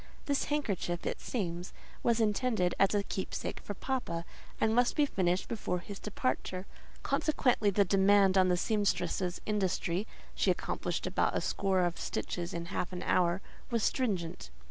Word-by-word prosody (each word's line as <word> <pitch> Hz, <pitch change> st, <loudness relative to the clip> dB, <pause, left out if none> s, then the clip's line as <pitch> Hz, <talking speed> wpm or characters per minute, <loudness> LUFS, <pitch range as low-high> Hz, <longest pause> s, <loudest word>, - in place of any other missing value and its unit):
This 280 Hz, -1 st, +1 dB
handkerchief, 200 Hz, -, -1 dB
it -, -, -2 dB
seems, 175 Hz, -6 st, -3 dB, 0.3 s
was 235 Hz, -1 st, +2 dB
intended 215 Hz, -4 st, +2 dB
as 195 Hz, +1 st, +4 dB
a 205 Hz, -, +2 dB
keepsake 190 Hz, -, -4 dB
for 205 Hz, -, -6 dB
"papa," 190 Hz, -10 st, -2 dB, 0.3 s
and 220 Hz, 0 st, +3 dB
must 245 Hz, +1 st, +3 dB
be 295 Hz, -, +4 dB
finished 185 Hz, -7 st, 0 dB
before 210 Hz, -5 st, -2 dB
his 195 Hz, +3 st, -8 dB
departure; 185 Hz, 0 st, -2 dB, 0.4 s
consequently 250 Hz, -8 st, +2 dB
the 200 Hz, 0 st, +3 dB
demand 195 Hz, 0 st, +5 dB
on 185 Hz, -1 st, +5 dB
the 180 Hz, -1 st, +3 dB
sempstress's 180 Hz, -3 st, 0 dB
industry 195 Hz, -1 st, 0 dB, 0.3 s
(she -, -, +1 dB
accomplished -, -, -1 dB
about -, -, +1 dB
a -, -, +2 dB
score 190 Hz, -2 st, +1 dB
of 175 Hz, -1 st, 0 dB
stitches 175 Hz, -1 st, -3 dB
in 170 Hz, 0 st, -4 dB
half 180 Hz, -, -2 dB
an 180 Hz, 0 st, -5 dB
hour) 180 Hz, +1 st, +2 dB, 0.3 s
was 230 Hz, -3 st, 0 dB
stringent. 180 Hz, -, -1 dB
195 Hz, 155 wpm, -32 LUFS, 180-220 Hz, 0.4 s, demand